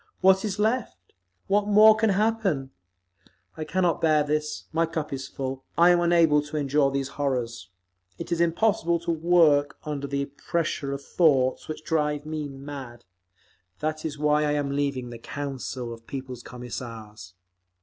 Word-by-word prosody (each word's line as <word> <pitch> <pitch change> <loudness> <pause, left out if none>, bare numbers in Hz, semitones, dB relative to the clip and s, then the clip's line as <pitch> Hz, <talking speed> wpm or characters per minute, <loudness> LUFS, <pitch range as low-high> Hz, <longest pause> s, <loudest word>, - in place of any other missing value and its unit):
What 190 0 +5
is 205 -2 -2
left? 215 - -2 0.3
What 205 +1 +1
more 215 +1 +7
can 220 0 +2
happen? 200 -9 0 0.8
I 155 - -4
cannot 175 +1 0
bear 155 -2 +4
this. 150 +1 -2
My 165 +1 +2
cup 160 -3 -4
is 135 -1 -4
full. 135 -1 -5
I 175 +1 +7
am 175 - +4
unable 170 -3 +4
to 150 +1 -6
endure 145 -1 +2
these 135 0 -2
horrors. 120 -8 -2 0.5
It - - -7
is 170 0 +1
impossible 170 -1 +2
to 170 - -1
work 160 -4 +3
under 145 -2 -4
the 140 0 -1
pressure 145 0 -3
of 140 0 -5
thoughts 135 -7 +2
which 155 0 -6
drive 150 -2 0
me 155 -1 -4
mad! 135 -3 -9 0.7
That 155 0 -2
is 150 -2 -4
why 150 0 +2
I 150 -1 +1
am 145 -1 -1
leaving 140 -3 -2
the 120 - -8
Council 130 -2 -5
of 115 0 -14
People's 130 -3 -6
Commissars. 115 -6 -8
150 Hz, 160 wpm, -26 LUFS, 135-170 Hz, 0.8 s, more